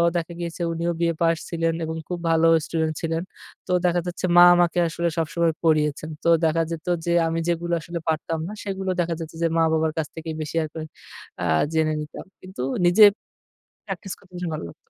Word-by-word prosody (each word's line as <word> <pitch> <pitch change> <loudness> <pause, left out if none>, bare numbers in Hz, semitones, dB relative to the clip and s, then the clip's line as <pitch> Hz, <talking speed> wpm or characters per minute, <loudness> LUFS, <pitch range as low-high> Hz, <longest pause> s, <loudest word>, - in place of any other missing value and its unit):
দেখা 170 0 -2
গিয়েছে 170 0 -5
উনিও 170 +1 -1
B - - -4
A - - -4
পাস 165 0 +3
ছিলেন 165 -1 0
এবং 160 0 -4
খুব 180 -1 -4
ভালো 165 0 +4 0.2
স্টুডেন্ট 160 -1 -1
ছিলেন। 165 0 -1 0.5
তো - - -3
দেখা 175 0 +2
যাচ্ছে 175 +1 -3
মা 175 - +10
আমাকে 175 0 +2
আসলে 170 +1 -1
সবসময় 165 0 +1
পড়িয়েছেন। 155 -1 +1
তো - - +3 0.2
দেখা 160 +1 +2
যেত 165 -1 -5 0.2
যে 170 - 0 0.2
আমি 165 0 -1
যেগুলো 170 0 -1
আসলে 170 +2 -5
পারতাম 160 +1 -1
না - - -6
সেগুলো 195 -1 -3
দেখা 170 0 -1
যাচ্ছে 160 -1 -7
যে - - +4
মা-বাবার 160 -1 +2
কাছ 160 -2 -1
থেকে 160 0 -7
বেশি 155 +1 -5
আরকি 155 +1 -7 0.6
আ - - 0 0.3
জেনে 160 -1 +2
নিতাম। 150 - -8 0.2
কিন্তু 185 -6 -8 0.2
নিজে 175 +5 +6 0.8
প্র্যাকটিস 195 -4 -5
করতে 185 -2 -24
বেশি 175 -1 -3
ভালো 155 - -4
লাগতো। - - -18
165 Hz, 195 wpm, -24 LUFS, 160-175 Hz, 0.8 s, মা